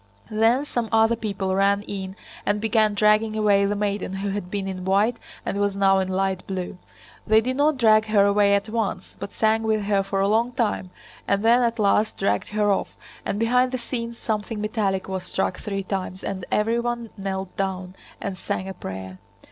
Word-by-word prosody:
Then 225 +6 +3
some 240 -5 -2
other 225 +1 +4
people 200 -4 -2
ran 200 +1 +2
in 190 -2 -6 0.3
and 205 0 +1
began 215 -1 +2
dragging 215 +1 +3
away 200 -2 +3
the 205 - 0
maiden 200 -2 -2
who 195 +1 -3
had 195 -2 -4
been 195 0 -3
in 185 -1 -5
white 200 +5 +2 0.3
and 200 - -2
was 205 -1 +1
now 195 -1 +4
in 190 - 0
light 190 0 0
blue. 185 -2 -4 0.5
They 220 +1 +6
did 255 +3 -1
not 290 +1 +2
drag 215 -3 +5
her 205 -2 +4
away 200 0 +4
at 200 +1 -1
once, 215 -4 -3
but - - -6
sang 220 0 +2
with 220 -1 0
her 200 -1 +2
for 195 0 -2
a 195 - +3
long 230 +4 +2
time 220 -6 -1 0.4
and 200 +2 +1
then 240 +2 +6
at 235 -1 +1
last 210 0 +2
dragged 100 0 0
her 210 -1 +1
off, 195 - -2 0.3
and - - -1
behind 250 +3 +2
the 255 - -1
scenes 235 -1 -4
something 215 -1 -3
metallic 210 -3 -1
was 190 -1 -3
struck 180 - -2
three 195 -1 -3
times 190 -1 -4
and 190 -2 -4
everyone 235 +1 0
knelt 190 -2 -4
down 185 -1 -3 0.3
and 190 -2 -5
sang 190 - -3
a 190 - -5
prayer. 95 - -7
205 Hz, 195 wpm, -24 LUFS, 195-225 Hz, 0.5 s, They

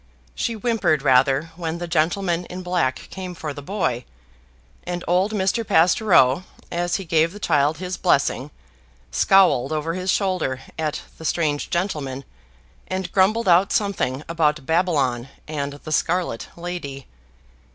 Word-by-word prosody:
She 230 - -2
whimpered 215 - +1
rather 135 +3 +3
when 165 -1 -3
the 175 0 -5
gentleman 170 +2 0
in 185 +1 -7
black 180 -8 +1 0.2
came 185 -2 -6
for 155 -3 -5
the 145 - -8
boy; 140 - -2 0.8
and 175 0 -4
old 185 +4 +2
Mr. 205 +2 0
Pastoureau, 175 - +4 0.3
as 175 0 0
he 195 - -3
gave 165 0 +2
the 205 - -10
child 150 -4 +2
his 180 +1 -4
blessing, 140 -4 +1 0.6
scowled 185 - +4
over 155 +1 -1
his 185 +1 -3
shoulder 180 -10 0
at 155 -2 -3 0.2
the - - -9
strange 150 -2 0
gentleman, 145 -7 -2 0.6
and 185 0 -3
grumbled 205 +4 +3
out 180 +2 +5
something 155 -10 0
about 155 -3 +1
Babylon 145 -8 +1 0.2
and 145 -2 -3
the 150 +2 -9
scarlet 170 -7 0
lady. 170 -7 -6
170 Hz, 140 wpm, -22 LUFS, 145-185 Hz, 0.8 s, out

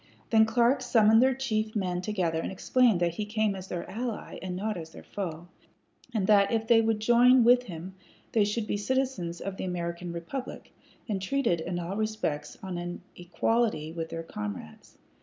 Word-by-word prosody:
Then 220 -1 +6
Clark 240 +4 +3
summoned 220 0 +5
their 260 0 +4
chief 220 -5 -2
men 180 -3 -1
together 180 -5 -1
and - - -4
explained 230 +1 +3
that 170 -1 +1
he 210 +4 -3
came 215 -1 +1
as 190 -1 -8
their 175 -2 -5
ally, 235 0 -5
and 185 -1 -4
not 210 +3 -2
as 165 -2 -7
their - - -12
foe, 175 -4 -5 0.6
and 215 -5 0
that 200 -1 +5
if 225 -1 0
they 230 0 +5
would 225 -1 +1
join 240 +3 +6
with 245 +2 +6
him 180 0 -8 0.4
they 220 - +3
should 210 +2 -1
be 205 - -1
citizens 205 -7 -1
of 195 -1 -5
the - - -4
American 175 -1 -4
republic, 170 +11 -6 0.3
and 200 -4 -2
treated 190 -5 0
in 175 +2 -3
all 175 +2 -4
respects 215 -9 -2
on 185 -2 -4
an 175 0 -6
equality 175 -2 0
with 165 -1 -5
their 165 0 -5
comrades. 105 - -7
205 Hz, 185 wpm, -28 LUFS, 175-225 Hz, 0.6 s, Then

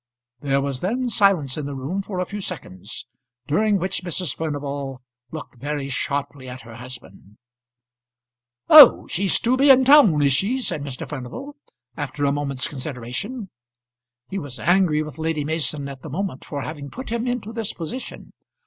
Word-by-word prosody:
There 140 +1 +1
was 135 -2 -2
then 245 - -1
silence 190 - +2
in 145 - -4
the 140 - -5
room 145 +9 -3
for 195 -1 -6
a 180 - 0
few 205 +3 -6
seconds, 120 - -7 0.4
during 205 +9 +2
which 190 +1 -2
Mrs. 175 -3 -2
Furnival 140 -4 -4 0.3
looked 150 -3 -9
very 145 +1 -3
sharply 140 -1 -3
at 130 +1 -9
her 115 0 -11
husband. 115 -5 -11 1.3
"Oh! 300 -5 +10
she's 190 +2 0
to 245 +2 +3
be 275 +2 +4
in 260 -1 +7
town, 260 - +7
is 140 -1 +4
she?" 200 - +1
said 195 - -3
Mr. 135 -3 -6
Furnival, 150 - -7 0.4
after 145 0 -3
a 140 - +3
moment's 140 -2 -1
consideration. 145 - -5 0.8
He 195 - -4
was 140 -5 -8
angry 175 -4 +3
with 150 -1 -9
Lady 160 -2 -1
Mason 150 -2 -1
at 135 -2 -9
the 155 - -8
moment 175 -2 -3
for 140 -2 -4
having 140 +2 -6
put 260 - -8
him 235 +1 -1
into 240 -3 -3
this 225 -3 -3
position. 220 +10 -7
150 Hz, 165 wpm, -23 LUFS, 140-200 Hz, 1.3 s, Oh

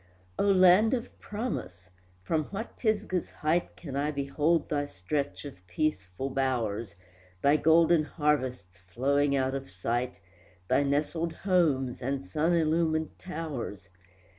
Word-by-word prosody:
O - - +3
Land 195 +4 +6
of 245 0 -7
Promise! 150 - -5 0.3
from 155 - 0
what 210 +7 -6
Pisgah's 205 -5 -1
height 160 +3 -1
Can 140 -6 -7
I 145 +2 0
behold 150 +3 +1
thy 145 -1 -1
stretch 140 +8 -3
of 130 -11 -10
peaceful 95 +1 -2
bowers, 120 -5 -1 0.5
Thy 140 +1 +5
golden 160 +1 +4
harvests 130 - -1
flowing 140 +9 +1
out 130 -1 +1
of 135 0 -5
sight, 120 +7 -2 0.5
Thy - - +3
nestled 150 +4 0
homes 150 -10 +1
and 135 -2 -2
sun 155 - +1
illumined 160 -1 +1
towers? 145 - -6
145 Hz, 125 wpm, -29 LUFS, 130-165 Hz, 0.5 s, Land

